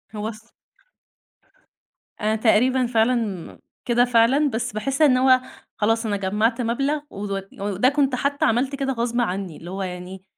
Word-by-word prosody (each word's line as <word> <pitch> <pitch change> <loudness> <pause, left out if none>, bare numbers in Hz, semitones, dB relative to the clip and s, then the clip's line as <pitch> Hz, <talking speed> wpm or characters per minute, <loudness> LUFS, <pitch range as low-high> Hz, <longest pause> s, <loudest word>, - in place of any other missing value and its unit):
هو 210 0 -3
الص 225 +1 -13 1.7
أنا 215 +1 +1
تقريبًا 250 +4 +3
فعلًا 225 -5 -1 0.3
كده 240 0 +3
فعلًا، 245 +5 +3
بس 240 -1 -3
باحس 265 +8 -2
إن 275 -5 +5
هو 255 0 +5 0.4
خلاص 225 +2 +1
أنا 205 -2 -1
جمعت 215 +5 0
مبلغ 275 +6 0
و - - -13 0.4
وده 205 +4 +2
كنت 280 -2 +1
حتى 280 +3 0
عملت 255 +5 +1
كده 270 -1 -2
غصب 240 0 -1
عني، 190 -6 -3
اللي 170 - -10
هو 195 +1 -4
يعني 180 +1 -7
230 Hz, 150 wpm, -23 LUFS, 210-255 Hz, 1.7 s, إن